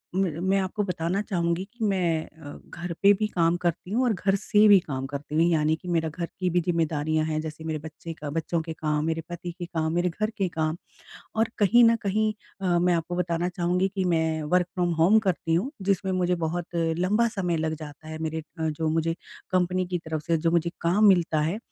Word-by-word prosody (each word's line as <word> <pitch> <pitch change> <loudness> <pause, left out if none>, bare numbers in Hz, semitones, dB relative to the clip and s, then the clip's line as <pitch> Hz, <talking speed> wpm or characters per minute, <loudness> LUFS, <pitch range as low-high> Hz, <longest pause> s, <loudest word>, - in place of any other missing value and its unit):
म 190 0 +2 0.2
मैं 195 - +3
आपको 195 +2 -1
बताना 180 +1 -1
चाहूँगी 175 -3 -1
कि 230 -2 -3
मैं 175 -5 0
अ, 150 -2 -11
घर 175 +1 -6
पे 200 - +8
भी 215 +2 -1
काम 170 -3 +2
करती 175 +2 -1
हूँ, 245 +5 +2
और 240 -3 +2
घर 195 +1 +1
से 210 +1 +4
भी 200 -2 +8
काम 135 -6 -4
करती 145 +2 -6
हूँ 160 - +4
यानी 155 -1 +2
कि 180 +3 -13
मेरा 165 -2 0
घर 170 +2 -4
की 185 -1 +1
भी 175 +1 +2
ज़िम्मेदारियाँ 155 -2 0
हैं 155 -1 -1
जैसे 155 0 -7
मेरे 155 -1 -3
बच्चे 160 +2 -8
का 150 -2 -7
बच्चों 165 +2 -1
के 160 0 -6
काम, 150 -1 -1
मेरे 165 0 -1
पति 175 0 -5
के 175 - -5
काम, 160 -2 -2
मेरे 175 +1 +1
घर 215 +5 -2
के 195 -2 +1
काम। 160 0 -1 0.6
और 225 0 +2
कहीं 235 +4 +6
न 230 0 +5
कहीं 215 +2 +1 0.3
अ, 180 -2 +2
मैं 175 0 +3
आपको 170 +1 -2
बताना 175 0 0
चाहूँगी 180 +1 0
कि 190 - 0
मैं 160 -3 +1
वर्क 180 +4 +2
फ्रॉम 175 -2 +1
होम 175 +7 +5
करती 165 -2 0
हूँ 190 +11 0
जिसमें 190 0 0
मुझे 180 -1 +1
बहुत 175 +1 -3
लंबा 180 +7 +1
समय 185 -7 -1
लग 160 0 -1
जाता 155 0 -10
है 155 0 -6
मेरे 160 0 -3 0.2
अ, 160 0 0
जो 155 +1 -1
मुझे 165 +1 0 0.4
कंपनी 185 0 +1
की 180 0 -2
तरफ 160 -2 -4
से 165 - +2
जो 165 +1 +1
मुझे 170 0 +1
काम 180 +6 +3
मिलता 170 -5 +3
है। 165 +7 -1
170 Hz, 225 wpm, -26 LUFS, 160-185 Hz, 0.6 s, पे